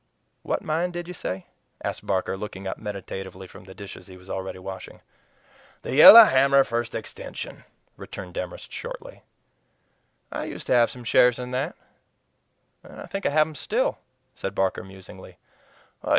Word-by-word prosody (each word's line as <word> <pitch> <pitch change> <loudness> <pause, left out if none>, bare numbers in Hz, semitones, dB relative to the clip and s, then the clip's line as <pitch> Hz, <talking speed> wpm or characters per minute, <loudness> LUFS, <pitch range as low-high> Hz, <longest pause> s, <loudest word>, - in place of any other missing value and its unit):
"What - - -2
mine 165 +3 0
did 175 -1 -6
you 180 - -6
say?" 95 - -5 0.4
asked - - -5
Barker, 95 -1 0
looking 95 -1 -7
up 95 - -4
meditatively 95 -2 -7
from 90 - -14
the 95 0 -12
dishes 100 -3 -10
he 95 -1 -12
was 90 +1 -12
already 95 0 -4
washing. 95 +1 -9 0.8
"The - - -4
Yellow 210 - +12
Hammer 140 -5 +5
First 120 -1 -3
Extension," 110 - -7 0.3
returned 90 -2 -9
Demorest 90 0 -6
shortly. - - -8 1.1
"I - - -4
used - - -7
to - - +1
have 120 -2 +5
some 125 - -9
shares 120 +1 +4
in 125 0 -6
that, 135 +6 -2 1.1
and - - -13
I - - -7
think 195 0 -3
I - - +2
have 155 +1 +4
them 155 - -9
still," 145 - -1 0.3
said 95 0 -5
Barker 95 -1 0
musingly. 95 0 -13
105 Hz, 160 wpm, -25 LUFS, 95-140 Hz, 1.1 s, Yellow